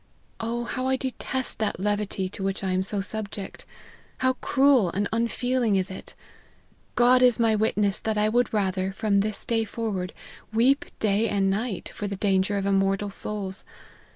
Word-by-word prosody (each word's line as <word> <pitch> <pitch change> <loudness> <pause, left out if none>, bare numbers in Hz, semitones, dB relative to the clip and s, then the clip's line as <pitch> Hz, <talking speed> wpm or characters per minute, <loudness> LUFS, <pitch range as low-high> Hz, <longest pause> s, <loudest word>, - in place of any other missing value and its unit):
Oh! 235 +1 -2
how 255 +2 -2
I 265 - +3
detest 260 0 -3
that 215 -5 -1
levity 205 -1 -1
to 195 - -8
which 195 +1 -2
I 190 - 0
am 185 0 +1
so 195 +1 -1
subject! 200 -1 -6 0.5
How 260 0 +2
cruel 270 -8 +4
and 200 +4 -1
unfeeling 235 0 +1
is 190 0 0
it! 190 - -9 0.8
God 250 +1 +5
is 250 -2 +5
my 225 -1 +4
witness 210 -2 +1
that 220 -1 -2
I 210 0 +3
would 240 +3 +2
rather, 190 -2 0
from 205 -1 +1
this 210 +1 -2
day 225 -1 +1
forward, 205 -4 -3 0.4
weep 250 +6 +3
day 215 +1 +1
and 195 -1 +2
night, 210 0 -2
for 205 - -5
the 200 - -3
danger 195 0 +1
of 195 - -1
immortal 195 +1 +1
souls. 195 -1 -4
210 Hz, 170 wpm, -26 LUFS, 195-235 Hz, 0.8 s, God